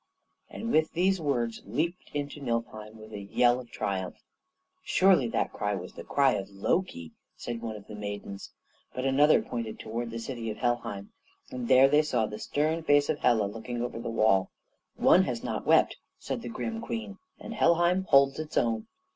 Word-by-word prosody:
And 230 +1 -5
with 155 0 +2
these 185 +1 +2
words 120 -6 -1
leaped 160 - -3
into 145 0 -4
Niflheim 115 -3 -4
with 110 0 -12
a 105 - -5
yell 120 +5 +2
of 120 -2 -11
triumph. 95 -4 -3 0.7
"Surely 185 -9 +4
that - - -1
cry 105 0 -1
was 90 -1 -7
the - - -9
cry 140 -2 +3
of 95 - -4
Loki," 100 - -2 0.3
said 120 -1 -5
one 115 -2 -4
of 105 - -11
the - - -11
maidens; 100 -1 -6 0.4
but 130 - -2
another 145 +3 +4
pointed 115 -2 -5
towards 115 +2 -4
the 115 - -6
city 115 -1 -5
of 105 - -5
Helheim, 115 -5 -2 0.4
and 125 -2 -4
there 130 +1 +7
they 150 +2 +4
saw 150 -7 0
the 105 0 -7
stern 155 +3 0
face 145 -2 +3
of 150 - 0
Hela 110 -4 +3
looking 115 +4 -5
over 120 -1 -4
the 115 0 -4
wall. 110 -4 +3 0.5
"One - - +5
has - - -3
not - - -4
wept," - - +4 0.2
said - - -4
the 120 - -6
grim 115 -1 -4
Queen, 110 -4 -5 0.2
"and - - -7
Helheim 175 +3 +3
holds 140 -2 +4
its 155 0 -5
own." 115 -2 +1
120 Hz, 185 wpm, -28 LUFS, 110-145 Hz, 0.7 s, there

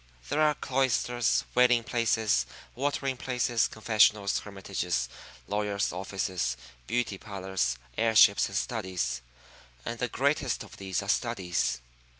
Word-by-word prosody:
There 145 +2 +1
are 150 -1 +4
cloisters, 125 -2 +1
wailing 125 -1 +5
places, 110 - +1 0.3
watering 135 0 -1
places, 125 -2 +1
confessionals, 110 -2 +3
hermitages, 95 -9 -3 0.4
lawyer's 105 -2 -1
offices, 90 -8 -2 0.3
beauty 120 -5 -1
parlors, 95 - -2 0.2
air 115 -1 +2
ships, 105 -2 +7
and 100 - -3
studies; 95 - -2 0.6
and 115 0 -4
the 125 - 0
greatest 135 +1 0
of - - -13
these 95 -2 -2
are - - -8
studies. 90 -8 0
110 Hz, 120 wpm, -29 LUFS, 95-125 Hz, 0.6 s, ships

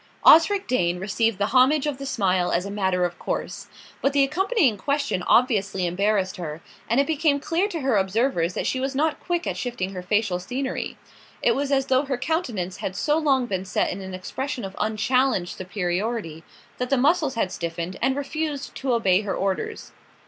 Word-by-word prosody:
Osric 390 +5 +6
Dane 180 -8 +1
received 210 +3 0
the 205 +3 -1
homage 270 +3 +5
of 290 -3 -2
the 275 - -5
smile 185 -7 +1
as 175 +2 0
a 200 - -5
matter 190 -3 +1
of 175 0 -5
course; - - -4 0.3
but 275 - +1
the 280 -1 +4
accompanying 350 - +2
question 280 -2 -1
obviously 200 -7 +2
embarrassed 195 +2 0
her, 160 -3 -5 0.3
and 235 +4 +3
it 280 - +4
became 300 -2 +1
clear 335 +7 0
to 340 -6 -4
her 260 -5 +2
observers 190 -3 +1
that - - -2
she 260 - 0
was 265 +1 -2
not 305 +2 +1
quick 350 0 -2
at - - -2
shifting 215 -6 -3
her 180 - -5
facial 200 -1 0
scenery. 260 +8 -4 0.5
It - - +5
was 280 +1 -1
as 270 -1 +2
though 265 +1 +2
her 270 -2 -2
countenance 240 - -2
had 190 - -4
so 300 +7 +1
long 270 -5 +2
been 190 -5 -2
set 190 - 0
in 195 - -5
an 190 -1 -6
expression 250 +6 -4
of 190 - -8
unchallenged 220 -2 +1
superiority 185 -2 -3 0.4
that 250 0 -2
the 275 - +3
muscles 295 +1 +2
had 195 -5 0
stiffened, 170 +2 -4
and 265 - +2
refused 285 0 -3
to 265 -2 -1
obey 195 -5 +3
her 205 -2 -3
orders. 190 -3 -3
230 Hz, 190 wpm, -24 LUFS, 185-275 Hz, 0.5 s, Osric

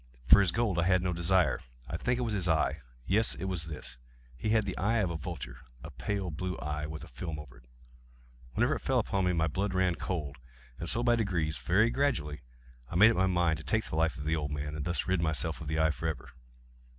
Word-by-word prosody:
For 65 - +8
his 95 -4 +4
gold 110 -6 +1
I 85 - +2
had 90 0 +3
no 90 -1 0
desire. 90 +2 +2 0.3
I 75 - -4
think 125 +8 0
it 125 - -1
was 115 -3 -1
his 95 -3 0
eye! 80 -2 +1 0.2
yes, 105 - +2
it 80 - -7
was 90 -4 0
this! 75 -6 -7 0.4
He 65 - -3
had 110 -1 +3
the 95 - -3
eye 110 +5 +1
of 100 -6 +1
a - - -3
vulture—a - - -8
pale 100 -4 -3
blue 90 +2 -3
eye, 75 +1 -3
with 80 0 -7
a - - -9
film 80 +6 -5
over 70 -5 -10
it. - - -19 0.9
Whenever - - +3
it - - -2
fell - - 0
upon 95 -1 +1
me, 90 - +2
my 80 -1 +2
blood 95 +5 -1
ran 95 -1 +3
cold; 75 -5 -4 0.4
and 85 - -4
so 120 - 0
by 120 -1 +4
degrees—very 95 +1 +1
gradually—I 65 - -3
made 110 +6 +8
up - - -2
my 95 +1 +3
mind 85 -4 +2
to - - -9
take 110 +10 0
the - - -5
life 80 +1 +1
of 75 - -6
the 80 +1 +1
old 75 -2 -2
man, 75 0 -4
and 75 -1 -4
thus 85 0 0
rid 90 -1 +2
myself 80 0 -1
of 75 - -6
the 80 +1 -1
eye 80 0 +4
forever. 80 -3 -4
85 Hz, 235 wpm, -30 LUFS, 75-95 Hz, 0.9 s, For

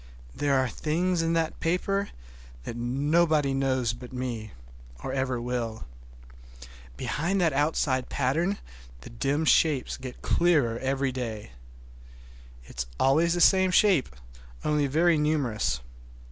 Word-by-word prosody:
There 140 - +1
are 130 0 +2
things 170 +8 -1
in 165 0 0
that 165 -1 -1
paper 195 +4 0 0.5
that 115 - -6
nobody 145 +4 +1
knows 130 -3 0
but 120 +1 -10
me, 125 -4 -4 0.5
or 130 - -4
ever 130 -2 -1
will. 120 -2 -3 1.1
Behind 180 +6 -1
that 165 -5 +2
outside 140 -2 0
pattern 165 +9 0 0.4
the - - -11
dim 140 +6 -1
shapes 150 -5 +2
get 130 -1 -9
clearer 145 -10 +2
every 135 0 -1
day. 115 - -5 1.1
It - - -12
is 65 - 0
always 160 +6 +3
the 175 - 0
same 190 +1 +5
shape, 180 -5 +3 0.6
only 150 -1 +2
very 160 +3 +3
numerous. 135 - 0
140 Hz, 125 wpm, -27 LUFS, 125-165 Hz, 1.1 s, same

